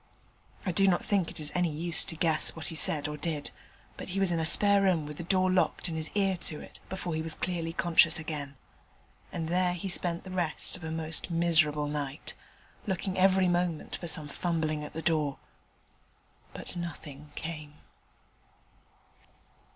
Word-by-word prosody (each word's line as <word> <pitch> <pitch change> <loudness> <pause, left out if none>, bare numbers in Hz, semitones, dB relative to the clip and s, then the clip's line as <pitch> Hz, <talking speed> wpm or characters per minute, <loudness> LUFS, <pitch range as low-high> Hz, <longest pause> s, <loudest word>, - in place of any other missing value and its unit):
I 185 - 0
do 195 +3 +3
not 180 -2 +1
think 195 -5 0
it - - -8
is 150 -1 -1
any 180 -1 +1
use 165 +2 +5
to 165 - -5
guess 160 -1 +2
what 160 - -6
he 165 - -7
said 150 -2 +3
or 150 0 -5
did; 150 -1 -3 0.5
but - - -8
he 190 +2 -2
was 195 -2 +3
in 170 - 0
a 160 - -1
spare 200 +4 +6
room 180 -6 +2
with 150 0 -8
the - - -5
door 185 +1 +2
locked 185 - +1
and 165 - -4
his 160 -1 -1
ear 195 -2 +1
to 155 -3 -2
it - - -10
before 185 -2 -4
he 160 - -2
was 160 0 0
clearly 170 -2 -3
conscious 165 -1 +4
again. 145 -3 -6 0.7
And 165 -2 -4
there 180 +1 +1
he 185 +2 -5
spent 175 -1 0
the 185 - -9
rest 175 -4 +2
of 180 - -9
a 160 - -4
most 160 +1 0
miserable 160 -3 +2
night, 145 -1 -3 0.5
looking 190 0 -2
every 190 0 +4
moment 175 -2 -1
for 170 - -6
some 155 -2 -1
fumbling 155 -1 -2
at 150 - -8
the 160 - -5
door: 150 -4 +1 1.1
but - - -4
nothing 150 -4 -8
came. 155 -2 -7
165 Hz, 180 wpm, -29 LUFS, 155-180 Hz, 1.1 s, spare